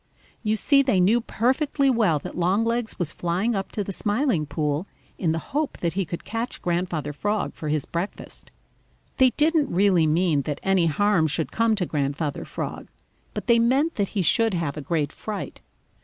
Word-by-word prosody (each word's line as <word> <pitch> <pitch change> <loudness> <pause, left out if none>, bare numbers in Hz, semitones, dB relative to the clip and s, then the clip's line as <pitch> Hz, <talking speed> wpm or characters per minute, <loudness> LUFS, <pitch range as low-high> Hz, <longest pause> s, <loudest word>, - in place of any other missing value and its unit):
You 215 -1 +1
see 275 +6 +4
they 255 -9 +2
knew 215 +7 +4
perfectly 270 +5 +1
well 220 - +3
that 145 - -7
Longlegs 220 +6 0
was 175 -5 -1
flying 180 +7 -1
up 195 -2 -3
to 205 - -1
the 195 - -5
Smiling 205 - 0
Pool 150 +4 -2 0.3
in 165 -4 +1
the 160 - 0 0.2
hope 300 0 -1
that 170 -1 -1
he 195 0 -1
could 170 +1 -6
catch 230 +2 -4
Grandfather 175 -4 -2
Frog 205 +8 -1
for 155 - -5
his 150 -2 0
breakfast. 175 +4 -6 0.7
They 260 -1 +6
didn't 310 0 +2
really 180 -3 +3
mean 160 -2 +2
that 145 +1 -4
any 190 -3 +3
harm 180 0 +2
should 155 +2 -1
come 230 -1 +2
to 190 -4 -1
Grandfather 145 -1 -2
Frog, - - -5 0.5
but - - -4
they 235 -2 +4
meant 265 +8 +2
that 200 -2 +1
he 190 - +2
should 225 +3 +3
have 165 -5 -2
a 150 - -5
great 150 -1 -1
fright. 215 -2 -6
195 Hz, 185 wpm, -24 LUFS, 160-230 Hz, 0.7 s, They